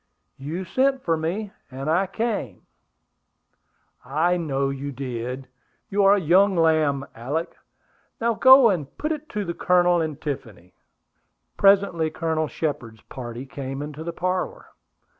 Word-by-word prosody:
"You 160 Hz, +7 st, -5 dB
sent 265 Hz, +6 st, +1 dB
for 165 Hz, -, +1 dB
me, 180 Hz, +6 st, -3 dB, 0.2 s
and 135 Hz, +1 st, -6 dB
I 180 Hz, +5 st, +2 dB
came." 200 Hz, -, -3 dB, 1.4 s
"I 155 Hz, +7 st, +1 dB
know 140 Hz, -5 st, -1 dB
you 140 Hz, +1 st, -5 dB
did. 125 Hz, 0 st, -5 dB, 0.4 s
You 200 Hz, +1 st, +1 dB
are 200 Hz, +1 st, +7 dB
a -, -, +1 dB
young 190 Hz, +4 st, +4 dB
lamb, 155 Hz, -4 st, +2 dB
Alick. 145 Hz, +9 st, -4 dB, 0.6 s
Now 235 Hz, 0 st, +1 dB
go 260 Hz, 0 st, +7 dB
and 155 Hz, -7 st, -4 dB
put 305 Hz, -, -2 dB
it 310 Hz, 0 st, -5 dB
to 210 Hz, -5 st, -3 dB
the 170 Hz, -, -3 dB
Colonel 175 Hz, 0 st, +3 dB
and 155 Hz, -3 st, -3 dB
Tiffany." 110 Hz, -, -6 dB, 0.8 s
Presently 195 Hz, -5 st, +3 dB
Colonel 160 Hz, -1 st, -1 dB
Shepard's 125 Hz, -9 st, -4 dB
party 120 Hz, 0 st, -7 dB
came 135 Hz, 0 st, -6 dB
into 150 Hz, +1 st, -7 dB
the 170 Hz, -, -4 dB
parlor. 180 Hz, +2 st, -3 dB
160 Hz, 140 wpm, -24 LUFS, 135-195 Hz, 1.4 s, are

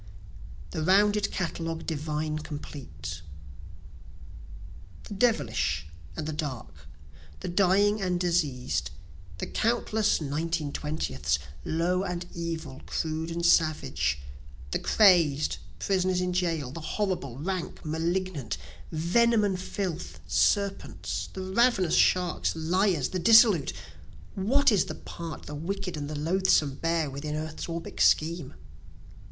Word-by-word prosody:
"The 160 Hz, -, -3 dB
Rounded 205 Hz, +4 st, +4 dB
Catalogue 165 Hz, -2 st, -3 dB
Divine 155 Hz, 0 st, -2 dB
Complete" 85 Hz, -, -7 dB, 1.8 s
The -, -, -8 dB
devilish 195 Hz, -, +1 dB, 0.3 s
and -, -, -3 dB
the 155 Hz, -, -3 dB
dark, 115 Hz, -, -6 dB, 0.5 s
the -, -, -4 dB
dying 200 Hz, +3 st, +3 dB
and 180 Hz, -2 st, 0 dB
diseas'd, 160 Hz, -8 st, 0 dB, 0.5 s
The -, -, -3 dB
countless 220 Hz, -2 st, +1 dB
(nineteen 155 Hz, +1 st, -2 dB
twentieths) 75 Hz, -, -1 dB, 0.3 s
low 175 Hz, +3 st, +1 dB
and 180 Hz, -2 st, -3 dB
evil, 165 Hz, -5 st, -5 dB
crude 160 Hz, 0 st, -2 dB
and 170 Hz, 0 st, -2 dB
savage, 155 Hz, -, +2 dB, 0.5 s
The -, -, 0 dB
crazed, 170 Hz, -8 st, +4 dB, 0.2 s
prisoners 185 Hz, -2 st, +1 dB
in 180 Hz, 0 st, -1 dB
jail, 165 Hz, -7 st, -1 dB
the 165 Hz, -, -7 dB
horrible, 165 Hz, -, -2 dB
rank, 180 Hz, +3 st, -4 dB
malignant, 160 Hz, -, -2 dB, 0.3 s
Venom 215 Hz, +8 st, +3 dB
and 190 Hz, -3 st, 0 dB
filth, 175 Hz, -, -4 dB
serpents, 195 Hz, -, 0 dB
the 190 Hz, -, -5 dB
ravenous 190 Hz, -2 st, +2 dB
sharks, 180 Hz, -3 st, +3 dB
liars, 170 Hz, -1 st, +1 dB
the 185 Hz, -, -2 dB
dissolute; 220 Hz, -, +6 dB, 0.6 s
(What 265 Hz, +8 st, +3 dB
is 205 Hz, -, +3 dB
the -, -, -6 dB
part 165 Hz, -2 st, -8 dB
the 150 Hz, -, -8 dB
wicked 180 Hz, +4 st, -4 dB
and 145 Hz, -1 st, -4 dB
the 150 Hz, -, -4 dB
loathesome 155 Hz, -3 st, +2 dB
bear 165 Hz, -2 st, +1 dB
within 150 Hz, +2 st, -4 dB
earth's 155 Hz, 0 st, -4 dB
orbic 165 Hz, 0 st, -5 dB
scheme?) 160 Hz, -2 st, +2 dB
165 Hz, 115 wpm, -28 LUFS, 150-190 Hz, 1.8 s, dissolute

